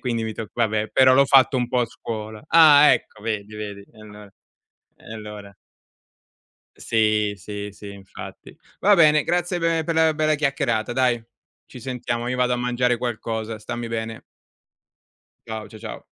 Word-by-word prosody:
quindi 115 -3 -2
mi 110 - -4
tocca 110 - -7 0.2
vabbè, 110 0 -2
però 130 -1 +5
l'ho 140 - +5
fatto 135 0 +4
un 125 -1 -1
po' 125 - +1
a 120 - 0
scuola. 110 -1 -7
Ah 150 -3 +7
ecco 120 -3 -3
vedi 105 -1 -4
vedi 105 -1 -7
e - - -20
allora, 105 -1 -13 0.6
e - - -13
allora. 105 -2 -10 1.2
Sì, 110 -2 +1
sì, 105 +2 -7
sì 100 +1 -11
infatti. 95 -1 -12 0.2
Va 205 +2 +5
bene 155 -4 +5
grazie 175 +1 -1
pe 165 -1 +1
per 165 - -2
la 160 -1 +3
bella 155 0 +1
chiacchierata 135 -6 -1
dai, 125 -2 +1 0.5
ci 125 - -12
sentiamo, 120 -2 -4
io 125 - -2
vado 125 0 +1
a 125 - +1
mangiare 125 0 0
qualcosa, 115 -2 -4
stammi 120 +2 -6
bene. 115 0 -5 1.2
Ciao, 110 -2 -6
cia 110 - -12
ciao. 110 0 -8
115 Hz, 165 wpm, -22 LUFS, 110-130 Hz, 1.2 s, Ah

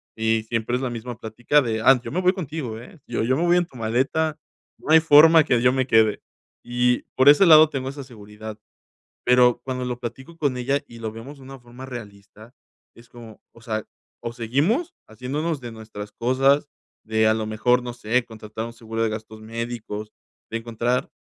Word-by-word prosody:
y 110 0 0
siempre 115 +1 -2
es 125 - -2
la 125 - -2
misma 120 0 -6
plática 120 +7 +1
de: 110 -2 -2
"Ah, 135 +1 +6
yo - - -7
me 185 - -1
voy 185 0 +3
contigo, 150 - -5
eh, 160 - -14
yo 120 - -2
yo 130 +3 +1
me 165 - 0
voy 175 0 +4
en 175 - +2
tu 150 - -22
maleta. 135 +8 -1 0.4
No - - -4
hay 160 - +8
forma 160 +1 +7
que 125 - +2
yo 125 0 +4
me 130 -1 0
quede". 110 -3 +3 0.4
Y 125 0 +1
por 130 - +3
ese 150 +7 +7
lado 155 -1 +8
tengo 135 -3 -4
esa 140 +1 -8
seguridad. 110 -3 -11 0.7
Pero, 125 -1 +4
cuando 130 -1 -3
lo 125 -1 -4
platico 130 +7 -8
con 145 -5 0
ella 135 +3 0
y 115 -1 -13
lo 110 -1 -4
vemos 125 +6 -10
de - - -16
una 135 +1 -10
forma 120 +1 -13
realista 110 -1 -11 0.4
es 115 0 -17
como, 115 -3 -13
o 115 - -18
sea, 110 -2 -3 0.4
o 115 - -4
seguimos 145 - 0
haciéndonos 140 +7 -3
de 120 -2 -8
nuestras 110 -2 -9
cosas, 135 +4 +2 0.4
de 110 0 +1
a 110 - +3
lo 110 0 -2
mejor 125 +3 +1
no 120 0 -5
sé 120 +1 0
contratar 110 0 -7
un 115 - -9
seguro 115 -1 -4
de 115 - +2
gastos 110 0 -8
médicos, 110 -2 -6 0.4
de 115 - -2
encontrar 120 +2 -2
120 Hz, 200 wpm, -23 LUFS, 110-135 Hz, 0.7 s, hay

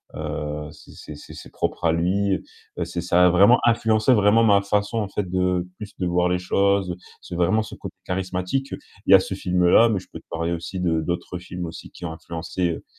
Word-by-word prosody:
heu, 75 0 -4
c'est - - -16
c'est 75 - -10
c'est 75 - -12
c'est - - -11
propre - - -3
à 80 - +4
lui. 95 +4 +1 0.4
Heu, 85 - -1
c'est 85 0 -5
ça 90 +1 +4
a - - +5
vraiment 100 +8 +6
influencé 115 0 +3
vraiment 105 +1 +4
ma 100 -2 +5
façon 105 +3 -1
en 105 - -2
fait 105 - -2
de, 90 -1 0
plus 105 -2 -9
de 90 - -1
voir 90 0 +2
les 90 - +1
choses. 100 0 +1 0.3
C'est - - -8
vraiment 95 +6 +2
ce 110 -1 -9
côté - - -9
charismatique, 90 +8 -2 0.3
il - - +1
y - - +10
a - - +8
ce 95 - -5
film-là, 90 +4 +4
mais 105 -4 0
je 95 - -15
peux - - -8
te - - -27
parler 85 +1 -2
aussi 85 +2 -5
de 80 -2 +1
d'autres 90 +1 -4
films 90 0 -6
aussi 80 - -9
qui - - -13
ont 80 - -4
influencé, 85 +2 -3
heu 80 - -6
90 Hz, 225 wpm, -23 LUFS, 85-100 Hz, 0.4 s, y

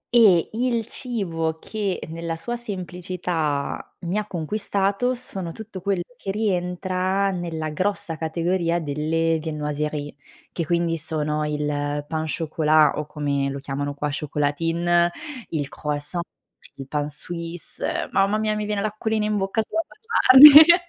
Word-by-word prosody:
E 195 -8 +6
il 235 0 0
cibo, 170 -11 -3
che 200 +1 -3
nella 165 0 -4
sua 240 +9 -4
semplicità 180 -8 -3
mi 180 +4 -1
ha 210 - -5
conquistato, 200 +6 0
sono 195 -8 -5
tutto 205 0 -9
quello 190 -2 0
che 195 - -7
rientra, 185 -1 0
nella 165 -4 -3
grossa 180 +1 -2
categoria 170 +2 0
delle 160 +2 0
viennoiserie, 150 -1 -3 0.4
che 165 -3 -3
quindi 170 -1 +1
sono 155 -1 -2
il 150 0 -2 0.4
pain 160 0 -2
chocolat 155 -2 +3
o 150 - -3
come 140 -2 -1
lo 140 - -4
chiamano 140 +1 -4
qua: 150 +1 -2
chocolatine, 165 +4 +1 0.4
il 145 -4 -2
croissant, 150 +4 -3 0.5
il 135 -1 -8
pain 145 +1 -2
suisse, 170 +3 -5
mamma 195 +2 +2
mia 215 0 0
mi 210 0 -2
viene 210 -1 -1
l'acquolina 215 +1 -1
in 210 0 0
bocca 195 +3 0
solo 330 - -1
ad - - -20 0.4
immaginarli. 300 +4 +12
170 Hz, 135 wpm, -23 LUFS, 155-200 Hz, 0.5 s, immaginarli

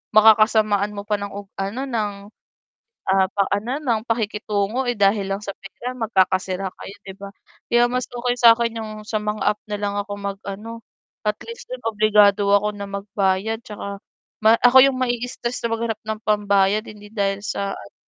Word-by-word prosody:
makakasamaan 215 -1 +5
mo 200 - -5
pa 210 -1 +1
ng 200 0 -5 0.3
ano 200 +7 -3
ng, 220 -5 -1 1.0
ah, 190 0 +4
pa 200 - 0
ano 210 +3 -4
yun, - - -14
ng 225 -3 +1
pakikitungo, 215 +1 -1
eh, 245 - 0
dahil 200 0 +2
lang 195 +2 -2
sa 200 - -4
pera 235 +6 -7
magkakasira 190 -3 +1
kayo 200 - -10
'di 190 - -7
ba? 200 0 -7 0.4
Kaya 240 0 +5
mas 250 -1 -1
okay 245 0 -1
sa'kin 230 -1 +5
yung 215 -1 -6 0.2
sa 215 - -1
mga 210 0 -3
app - - -46
nalang 205 -1 -2
ako 205 0 -7
mag-ano, 200 +3 -6 0.4
at 210 0 +1
least 465 +1 -9
don - - -5
obligado 210 -1 +4
ako 210 +1 +3
na 200 0 -6
magbayad 200 +2 -1
tsaka 200 -1 -7 0.4
ma 225 +1 +6
ako 245 +2 +6
yung 260 - -5
ma-i-stress 245 0 -2
na - - 0
maghanap 225 -1 -2
ng 220 0 -3
pambayad 205 -1 +2
hindi 210 -1 -12
dahil 200 -2 -1
sa 200 0 -2
ano, 100 - -13
210 Hz, 175 wpm, -22 LUFS, 200-230 Hz, 1.0 s, ma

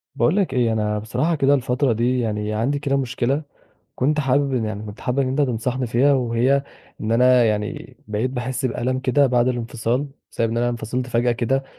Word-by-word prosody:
باقول 160 - +2
لك 195 -3 +1
إيه، 120 -3 +2
أنا 105 -1 0
بصراحة 155 +10 -1
كده 140 -1 +3
الفترة 125 -1 +1
دي 125 +3 +1
يعني 105 -2 -2
عندي 125 +7 0
كده 140 -1 0
مشكلة، 135 +2 -1 0.5
كنت 150 +4 +1
حابب 140 0 +1
إن 120 -3 0
يعني 105 -1 -4
كنت 105 +1 -9
حابب 125 +2 -1
إن 135 - +2
أنت 135 +3 +1
تنصحني 125 0 -1
فيها، 130 +5 +3
وهي 130 +2 +2 0.4
إن 110 - -2
أنا 125 +1 +5
يعني 105 -1 -3
بقيت 110 +4 -1
باحس 130 +1 -3
بألم 130 +1 -1
كده 135 +2 +3
بعد 125 -1 +2
الانفصال، 120 +2 -1 0.2
بسبب 115 -1 0
إن 115 - -2
أنا 120 +1 +1
انفصلت 120 +2 -3
فجأة 120 0 +1
كده، 125 +3 0
125 Hz, 195 wpm, -22 LUFS, 115-135 Hz, 0.5 s, أنا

